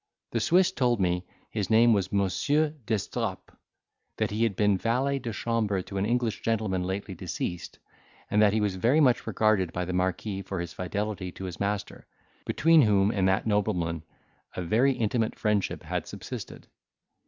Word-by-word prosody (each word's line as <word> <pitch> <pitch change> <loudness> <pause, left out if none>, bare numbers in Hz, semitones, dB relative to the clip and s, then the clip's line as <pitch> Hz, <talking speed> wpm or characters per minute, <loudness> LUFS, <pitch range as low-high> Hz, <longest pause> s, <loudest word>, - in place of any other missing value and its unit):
The - - 0
Swiss 180 +1 +4
told 120 -4 +1
me 90 -1 0 0.2
his 105 -3 -2
name 115 +1 +6
was 95 -2 0
Monsieur 120 - +1 0.2
d'Estrapes, 110 -3 -3 0.6
that - - 0
he 105 +2 -2
had 115 -4 +2
been 105 0 +3
valet 130 +6 0
de 120 -2 -4
chambre 105 -4 -1
to 100 - -7
an 100 - 0
English 120 -1 0
gentleman 110 -5 0
lately 95 +2 -3
deceased, 85 0 -5 0.5
and 105 +1 +4
that 105 -1 +6
he 110 +1 +1
was 100 -3 0
very 120 +10 +3
much 125 -6 +3
regarded 105 -5 +2
by 90 +1 -3
the 90 - -4
marquis 95 +2 -1
for 95 -1 -5
his 85 0 -5
fidelity 100 0 -3
to - - -9
his 90 -2 -6
master, 100 +1 -3 0.4
between 165 0 +5
whom 100 -3 +3
and 95 -4 +1
that 95 +1 +1
nobleman 95 -6 0 0.5
a 90 - -3
very 120 +10 +3
intimate 115 -1 -1
friendship 105 -3 0
had - - -3
subsisted. - - -8
105 Hz, 170 wpm, -27 LUFS, 95-115 Hz, 0.6 s, name